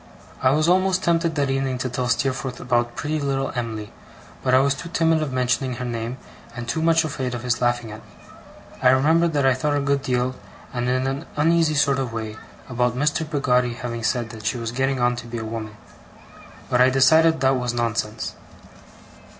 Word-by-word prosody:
I 130 - +4
was 155 +4 +2
almost 185 +1 +2
tempted 165 -1 +1
that 140 -2 +1
evening 135 -1 -1
to 125 - -2
tell 125 0 -2
Steerforth 130 +1 -1
about 120 -1 0
pretty 155 +1 -2
little 135 -1 -1
Em'ly, 110 -4 -4 0.5
but 130 -1 +2
I - - +7
was 140 +1 +3
too 170 - -8
timid 165 -1 +2
of 150 -3 -2
mentioning 125 0 0
her 125 +1 -5
name, 120 +1 -4 0.4
and 120 -1 -6
too 160 +7 -1
much 165 0 +4
afraid 130 -4 -3
of 120 - -6
his 125 -1 0
laughing 120 -2 0
at 105 - -8
me. - - -20 0.7
I 125 - +5
remember 155 +6 +4
that 145 -4 0
I 135 - +5
thought 145 +3 0
a - - +1
good 140 0 +1
deal, 125 -1 0 0.4
and 120 0 -1
in 130 +1 +1
an 135 +1 -3
uneasy 160 +1 +3
sort 140 -1 +2
of 130 -3 -2
way, 110 -1 -4 0.3
about 125 -1 0
Mr. 150 +3 0
Peggotty 125 -5 +1
having 120 -2 -5
said 115 0 -1
that 110 -2 -10
she 120 - -1
was 115 -1 -4
getting 135 +1 0
on 120 0 +2
to 120 - -7
be 120 0 -5
a 110 - -4
woman; 110 -1 -6 0.9
but 125 - +2
I 130 - +6
decided 160 +5 +4
that 135 0 +3
was 125 -1 -1
nonsense. 115 -2 -2
130 Hz, 205 wpm, -23 LUFS, 120-145 Hz, 0.9 s, I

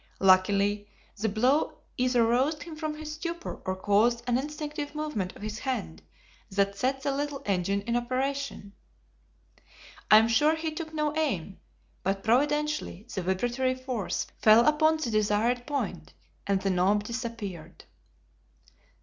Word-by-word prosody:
Luckily 200 +2 +3 0.3
the 220 +1 -1
blow 250 +9 +1 0.2
either 250 -2 +3
roused 270 +6 +1
him 335 -2 -9
from 310 -1 -3
his 305 0 -6
stupor 335 +2 -5
or 185 - -1
caused 215 +5 +2
an 245 0 +2
instinctive 295 0 -5
movement 300 -12 -3
of - - -11
his 215 0 -4
hand 80 - -3 0.5
that 200 0 +1
set 265 +5 -1
the 280 - +1
little 290 -1 -3
engine 195 0 0
in 235 +2 -1
operation. 255 -3 -2 1.4
I 215 - +9
am 220 +1 +5
sure 295 +7 +3
he 320 0 -3
took 315 0 -6
no 300 -1 -1
aim, 200 - -2 0.4
but 195 +1 -1
providentially 295 - +1
the 190 - -2
vibratory 240 +8 0
force 255 -6 -3
fell 220 +2 +6
upon 310 +1 +4
the 270 -7 -3
desired 215 +3 +1
point, 195 - -4 0.3
and 200 -1 +2
the 195 - +1
knob 190 +3 +2
disappeared. 220 -7 -6
240 Hz, 140 wpm, -28 LUFS, 200-295 Hz, 1.4 s, I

